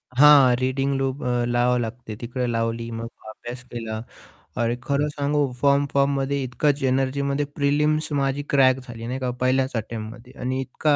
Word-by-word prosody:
हां, 140 Hz, -3 st, +7 dB
reading 135 Hz, +2 st, 0 dB
loop 135 Hz, +1 st, -2 dB
अ, 120 Hz, -1 st, 0 dB
लावावं 120 Hz, +1 st, +2 dB
लागते. 115 Hz, -1 st, -5 dB
तिकडे 125 Hz, +1 st, -3 dB
लावली, 115 Hz, 0 st, -2 dB
मग 115 Hz, 0 st, -5 dB, 0.2 s
अभ्यास 120 Hz, +3 st, -8 dB
केला. 110 Hz, -2 st, -4 dB, 0.6 s
आणि 120 Hz, 0 st, +1 dB
खरं 140 Hz, +1 st, +1 dB
सांगू 145 Hz, -1 st, +1 dB
फॉर्म, 140 Hz, 0 st, +4 dB
फॉर्ममध्ये 140 Hz, 0 st, +1 dB
इतकाच 135 Hz, +3 st, 0 dB
एनर्जीमध्ये 140 Hz, +2 st, 0 dB
प्रिलिम्स 150 Hz, +2 st, +1 dB
माझी 135 Hz, +1 st, 0 dB
क्रॅक 130 Hz, -2 st, +4 dB
झाली 115 Hz, -1 st, -7 dB
नाही 130 Hz, +2 st, -3 dB
का, 130 Hz, -1 st, -2 dB
पहिल्याच 130 Hz, +1 st, +2 dB
अटेम्प्टमध्ये 115 Hz, +2 st, -6 dB
आणि 130 Hz, +1 st, -1 dB
इतका, 145 Hz, +3 st, +1 dB
130 Hz, 155 wpm, -24 LUFS, 120-140 Hz, 0.6 s, हां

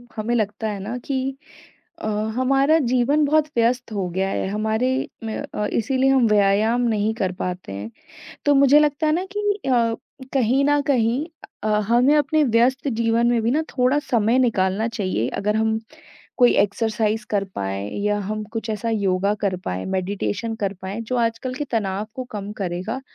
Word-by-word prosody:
हमें 220 Hz, +2 st, -2 dB
लगता 215 Hz, 0 st, -1 dB
है 205 Hz, -2 st, -4 dB
ना 220 Hz, +6 st, -4 dB
कि 270 Hz, 0 st, -2 dB, 0.6 s
अ, -, -, -3 dB, 0.3 s
हमारा 275 Hz, +4 st, +3 dB
जीवन 255 Hz, +3 st, +2 dB
बहुत 305 Hz, +1 st, +3 dB
व्यस्त 240 Hz, +1 st, +1 dB
हो 195 Hz, -4 st, -2 dB
गया 190 Hz, +2 st, -1 dB
है, -, -, -2 dB
हमारे 220 Hz, +5 st, 0 dB, 0.3 s
मैं 220 Hz, -1 st, -3 dB, 0.2 s
अ, 210 Hz, -, -1 dB
इसीलिए 260 Hz, +3 st, +1 dB
हम 260 Hz, -4 st, +4 dB
व्यायाम 210 Hz, +3 st, +3 dB
नहीं 215 Hz, 0 st, +1 dB
कर 190 Hz, -5 st, -1 dB
पाते 180 Hz, -, -4 dB
हैं। 100 Hz, +3 st, -6 dB, 0.5 s
तो 290 Hz, -, +5 dB
मुझे 280 Hz, +2 st, +6 dB
लगता 300 Hz, +1 st, +1 dB
है 305 Hz, -, +3 dB
ना 360 Hz, +3 st, -1 dB
कि -, -, 0 dB, 0.3 s
अ, 230 Hz, -3 st, +2 dB, 0.4 s
कहीं 265 Hz, +1 st, +2 dB
न 290 Hz, 0 st, +3 dB
कहीं 250 Hz, +1 st, +2 dB, 0.4 s
अ, -, -, -1 dB, 0.2 s
हमें 250 Hz, +5 st, +4 dB
अपने 300 Hz, +2 st, +2 dB
व्यस्त 250 Hz, +3 st, +2 dB
जीवन 230 Hz, -1 st, +1 dB
में 240 Hz, -1 st, +2 dB
भी 230 Hz, +2 st, +1 dB
ना 305 Hz, -, +2 dB, 0.2 s
थोड़ा 255 Hz, +4 st, +3 dB
समय 235 Hz, -2 st, +1 dB
निकालना 215 Hz, -3 st, +1 dB
चाहिए 185 Hz, -, -2 dB
अगर 210 Hz, +1 st, 0 dB
हम 220 Hz, 0 st, +1 dB, 0.6 s
कोई 245 Hz, -2 st, +5 dB
एक्सरसाइज़ 215 Hz, +1 st, +1 dB
कर 200 Hz, -2 st, +1 dB
पाएँ 100 Hz, +1 st, -3 dB, 0.2 s
या 205 Hz, 0 st, +1 dB
हम 215 Hz, +2 st, -3 dB
कुछ 225 Hz, -1 st, -4 dB
ऐसा 220 Hz, +2 st, -2 dB
योगा 200 Hz, -1 st, +1 dB
कर 195 Hz, -3 st, 0 dB
पाएँ, 90 Hz, +1 st, -3 dB
मेडिटेशन 200 Hz, +4 st, -2 dB
कर 200 Hz, -1 st, 0 dB
पाएँ, 195 Hz, +4 st, -4 dB
जो 230 Hz, +3 st, -3 dB
आजकल 235 Hz, +2 st, -1 dB
के 295 Hz, -, -3 dB
तनाव 210 Hz, -2 st, -1 dB
को 255 Hz, -, -4 dB
कम 205 Hz, -1 st, -5 dB
करेगा 185 Hz, +8 st, -3 dB
225 Hz, 175 wpm, -22 LUFS, 205-255 Hz, 0.6 s, मुझे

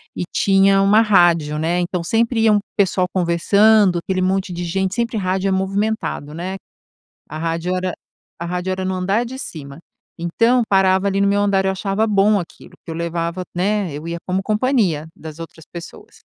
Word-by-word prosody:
E -, -, -3 dB
tinha 195 Hz, 0 st, +4 dB
uma 205 Hz, +3 st, +5 dB
rádio, 170 Hz, -7 st, +3 dB
né, 170 Hz, +3 st, 0 dB
então 175 Hz, 0 st, -2 dB
sempre 225 Hz, +4 st, +1 dB
ia 220 Hz, -1 st, +4 dB
um 205 Hz, -, +4 dB, 0.2 s
pessoal 190 Hz, -2 st, +2 dB
conversando, 190 Hz, +2 st, +3 dB
aquele 185 Hz, +2 st, -2 dB
monte 190 Hz, 0 st, 0 dB
de 175 Hz, 0 st, -4 dB
gente 190 Hz, +3 st, -1 dB
sempre, 235 Hz, 0 st, -1 dB
rádio 190 Hz, 0 st, -1 dB
é -, -, 0 dB
movimentado, 195 Hz, -5 st, -2 dB
né. 180 Hz, +4 st, -5 dB, 0.7 s
A 155 Hz, -, -6 dB
rádio 165 Hz, +2 st, -2 dB
era 185 Hz, -1 st, -2 dB, 0.5 s
a 170 Hz, -, -4 dB
rádio 180 Hz, +2 st, -3 dB
era 185 Hz, 0 st, -3 dB
no 190 Hz, -, -1 dB
andar 195 Hz, +6 st, 0 dB
de 260 Hz, +2 st, -7 dB
cima, 145 Hz, -, -9 dB, 0.4 s
então 230 Hz, +9 st, +2 dB
parava 190 Hz, 0 st, +3 dB
ali 195 Hz, 0 st, 0 dB
no 200 Hz, -, +3 dB
meu 205 Hz, 0 st, +2 dB
andar, 195 Hz, -1 st, +1 dB
eu 190 Hz, -, +2 dB
achava 195 Hz, +3 st, -1 dB
bom 205 Hz, 0 st, +3 dB
aquilo, 170 Hz, -, -10 dB
porque -, -, -10 dB
eu 160 Hz, -, -5 dB
levava 170 Hz, +1 st, -3 dB
né, 195 Hz, 0 st, 0 dB
eu 150 Hz, +3 st, -7 dB
ia 170 Hz, 0 st, -3 dB
como 185 Hz, +1 st, 0 dB
companhia 210 Hz, -, 0 dB
das 160 Hz, 0 st, -10 dB
outras 165 Hz, -1 st, -10 dB
pessoas. 170 Hz, -1 st, -11 dB
190 Hz, 185 wpm, -19 LUFS, 170-205 Hz, 0.7 s, uma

